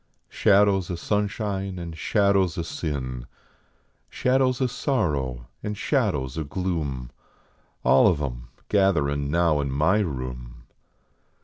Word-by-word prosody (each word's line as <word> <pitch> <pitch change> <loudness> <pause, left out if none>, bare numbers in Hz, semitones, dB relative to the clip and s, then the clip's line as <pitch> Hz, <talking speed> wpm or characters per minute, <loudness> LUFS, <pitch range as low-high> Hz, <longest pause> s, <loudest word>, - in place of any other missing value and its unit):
Shadows 100 -3 +3
o 90 - -2
sunshine 100 0 -2
and 85 -2 -6
shadows 100 0 +2
o 85 - -1
sin, 65 -7 -4 0.8
Shadows 130 -1 +1
o 130 - +2
sorrow 75 - -1 0.2
and 105 0 -4
shadows 65 -3 0
o - - -1
gloom. 75 -7 -3 0.7
All 65 - +6
of 90 -7 +2
em - - -5 0.2
gatherin 75 -8 +2
now 85 -1 +2
in 70 - -2
my 80 +10 +2
room. 65 - -5
85 Hz, 115 wpm, -25 LUFS, 70-100 Hz, 0.8 s, All